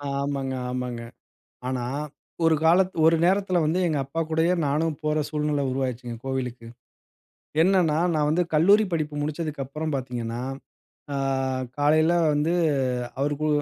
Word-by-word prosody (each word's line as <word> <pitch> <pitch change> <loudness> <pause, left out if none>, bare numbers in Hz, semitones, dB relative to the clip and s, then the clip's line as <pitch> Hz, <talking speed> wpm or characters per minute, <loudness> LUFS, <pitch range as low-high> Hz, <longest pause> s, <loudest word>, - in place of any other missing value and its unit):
ஆமாங்க. 140 -1 -2 0.2
ஆமாங்க. 125 -2 -3 0.7
ஆனா, 125 -2 -2 0.6
ஒரு 160 -1 +5
காலத் 180 +3 +4
ஒரு 165 +1 +6
நேரத்தில 190 -1 +2
வந்து 165 +4 +1
எங்க 155 -3 0
அப்பா 165 +4 -3
கூடயே 160 +3 +2
நானும் 155 +2 0
போற 155 0 +1
சூழ்நிலை 150 -2 0
உருவாயிருச்சுங்க, 125 -2 -3
கோவிலுக்கு. 125 -3 -4 0.9
என்னென்னா, 175 -4 +3 0.2
நான் 150 -1 +2
வந்து 175 +3 +2
கல்லூரி 200 +8 +5
படிப்பு 150 -2 -2
முடிச்சதுக்கப்புறம் 150 -1 -3
பாத்தீங்கன்னா, 120 -2 -4 0.7
அ - - -1 0.6
காலையில 155 +3 +4 0.2
வந்து 150 +3 +1 0.7
அவருக்கு 145 +2 0
150 Hz, 120 wpm, -25 LUFS, 135-165 Hz, 0.9 s, ஒரு